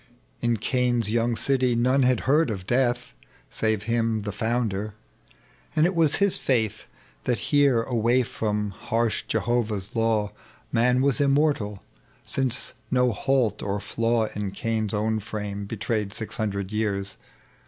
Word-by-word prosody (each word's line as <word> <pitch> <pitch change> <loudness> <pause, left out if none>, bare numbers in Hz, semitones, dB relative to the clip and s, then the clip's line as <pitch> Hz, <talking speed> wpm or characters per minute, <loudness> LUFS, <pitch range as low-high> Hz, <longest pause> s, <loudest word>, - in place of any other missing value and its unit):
In 120 -1 +1
Cain's 120 -2 +1
young 115 +1 +1
city 125 +1 +2
none 130 +4 +3
had 125 -2 +3
heard 150 +3 +3
of 95 -4 -4
Death 120 - 0 0.4
Save 110 -2 0
him, 115 -1 0
the 105 - -3
founder; 110 -2 -2 0.8
and 155 - +4
it 180 - +1
was 165 -4 +3
his 200 -1 +3
faith 110 -6 0 0.4
That 125 -2 +1
here, 140 -5 +4
away 120 +1 +2
froni 105 -3 -2
harsh 115 +3 -1
Jehovah's 110 -3 -1
law, 110 -2 +1 0.4
Man 125 +2 +3
was 140 -2 +2
immortal, 140 -8 +1 0.4
since 130 -2 0 0.2
no 125 -1 +3
halt 120 -2 0
or 100 0 -2
flaw 115 +2 0
In 105 -1 -2
Cain's 110 0 -2
own 110 +1 0
frame 100 -1 -5
betrayed 105 -1 -2
six 110 - -4
hundred 100 -2 -2
years. 100 -2 -2
115 Hz, 140 wpm, -25 LUFS, 105-125 Hz, 0.8 s, and